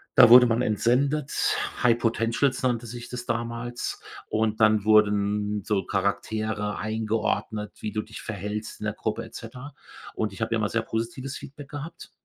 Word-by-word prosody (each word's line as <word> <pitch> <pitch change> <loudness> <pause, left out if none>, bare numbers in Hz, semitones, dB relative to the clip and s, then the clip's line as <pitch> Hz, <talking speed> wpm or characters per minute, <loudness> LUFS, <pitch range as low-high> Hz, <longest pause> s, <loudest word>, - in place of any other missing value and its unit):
da - - +9
wurde 125 +1 +10
man 115 +2 +1
entsendet, 130 +7 +1 0.3
high 120 -1 +5
potentials 115 +3 +1
nannte 120 -2 0
sich 120 +1 -7
das 125 -1 -6
damals, 115 +1 -3 0.3
und 110 0 0
dann 110 -1 +5
wurden 105 -1 +3
so 100 -2 0
Charaktere 105 +1 -1
eingeordnet, 110 -1 -1
wie 105 - -3
du 110 - -1
dich 110 +1 -10
verhältst 105 0 -5
in 110 - -5
der 105 - -1
Gruppe 110 +1 -3
et 115 - -14
cetera 125 +5 -9 0.4
und 105 -3 -2
ich 105 - -10
habe 115 +1 0
ja - - +2
immer 105 -2 0
sehr 115 - 0
positives 120 +5 -4
Feedback 140 +1 -10
gehabt. 150 +3 -8
115 Hz, 165 wpm, -26 LUFS, 105-120 Hz, 0.4 s, wurde